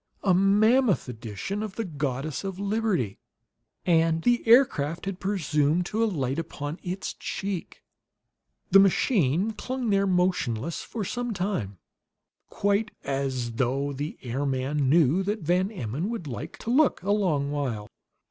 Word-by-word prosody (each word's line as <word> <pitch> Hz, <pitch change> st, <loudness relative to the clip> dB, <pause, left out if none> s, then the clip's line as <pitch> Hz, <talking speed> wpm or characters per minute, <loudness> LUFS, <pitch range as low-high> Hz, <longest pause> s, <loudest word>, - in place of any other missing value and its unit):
A 190 Hz, -, +4 dB
mammoth 210 Hz, -, +4 dB
edition 120 Hz, -, -5 dB
of 215 Hz, -3 st, -5 dB
the 225 Hz, -, -2 dB
Goddess 145 Hz, -2 st, -3 dB
of 195 Hz, -2 st, -4 dB
Liberty; 200 Hz, -, -1 dB, 0.7 s
and 165 Hz, -1 st, +3 dB
the 240 Hz, -1 st, +3 dB
aircraft 175 Hz, -, +4 dB
had 195 Hz, -1 st, -4 dB
presumed 165 Hz, -4 st, +1 dB
to 220 Hz, +5 st, 0 dB
alight 140 Hz, -, -1 dB
upon 150 Hz, -1 st, -5 dB
its 185 Hz, +1 st, -4 dB
cheek! 195 Hz, -3 st, -5 dB, 0.9 s
The 195 Hz, -, +9 dB
machine 195 Hz, -, +3 dB
clung 250 Hz, +1 st, -3 dB
there, 200 Hz, 0 st, +3 dB
motionless, 170 Hz, -, 0 dB
for 220 Hz, -4 st, -5 dB
some 245 Hz, +1 st, -3 dB
time, 175 Hz, -, -2 dB, 0.7 s
quite 205 Hz, +2 st, +1 dB
as 130 Hz, -4 st, -2 dB
though 135 Hz, +3 st, 0 dB
the 145 Hz, +3 st, -5 dB
airman 135 Hz, +2 st, -1 dB
knew 160 Hz, +3 st, +4 dB
that 205 Hz, 0 st, -2 dB
Van 180 Hz, +4 st, +2 dB
Emmon 160 Hz, -, -3 dB
would 230 Hz, -8 st, -4 dB
like 120 Hz, -7 st, -6 dB
to 230 Hz, -, -2 dB
look 280 Hz, -4 st, +3 dB
a 200 Hz, -, 0 dB
long 160 Hz, -9 st, +1 dB
while. 125 Hz, -8 st, -2 dB
175 Hz, 140 wpm, -26 LUFS, 140-205 Hz, 0.9 s, The